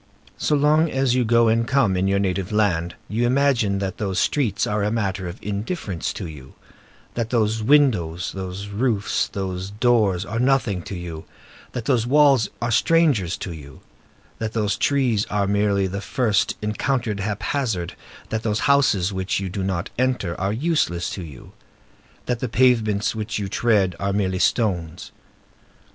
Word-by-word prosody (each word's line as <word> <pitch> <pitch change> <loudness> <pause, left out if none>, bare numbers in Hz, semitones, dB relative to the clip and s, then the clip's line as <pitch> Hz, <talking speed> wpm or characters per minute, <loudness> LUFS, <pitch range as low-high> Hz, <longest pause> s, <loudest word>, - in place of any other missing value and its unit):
So 150 - +1
long 150 +3 +3
as 135 -3 +1
you 125 0 +2
go 115 0 +4
and 115 +1 +2
come 130 -8 +2
in 95 +1 +1
your 100 0 +2
native 95 -1 -1
land, 90 -6 +1
you 110 +3 -1
imagine 125 -6 +2
that 95 -1 -4
those 95 -3 -2
streets 120 -10 +1
are 105 0 -1
a 105 - +1
matter 100 -4 -2
of 85 - -7
indifference 100 - -3
to - - -6
you; 75 -5 -11 0.6
that 115 -2 -2
those 110 -2 +1
windows, 105 - +2
those 95 +1 -6
roofs, 105 -1 0
and - - -21
those 95 -1 -3
doors 105 -4 +2
are 115 +2 -3
nothing 125 -7 +1
to 100 - -6
you; 85 -3 -7 0.5
that 125 -3 -4
those 120 -3 +1
walls 140 -4 +4
are 120 - 0
strangers 145 - +2
to 90 - -6
you; 70 -4 -12 0.6
that 110 -1 -3
those 105 -2 0
trees 125 -4 +1
are 105 -1 0
merely 100 0 +1
the 95 +1 -4
first 110 -4 0
encountered 110 0 -1
haphazard; 105 -2 -2 0.4
that 110 0 -2
those 105 -2 -1
houses, 135 -10 +3
which 95 0 -1
you 95 -1 -4
do 100 +2 -4
not 95 -2 -2
enter, 125 -9 0
are 95 +1 0
useless 110 - 0
to 95 - -5
you; 75 -7 -11 0.7
that 125 -2 -1
the 125 - -3
pavements 110 -4 +2
which 110 -1 -4
you 100 -2 -3
tread 100 -4 +1
are 100 0 -1
merely 95 -2 0
stones. 90 -7 0
105 Hz, 165 wpm, -22 LUFS, 95-120 Hz, 0.7 s, go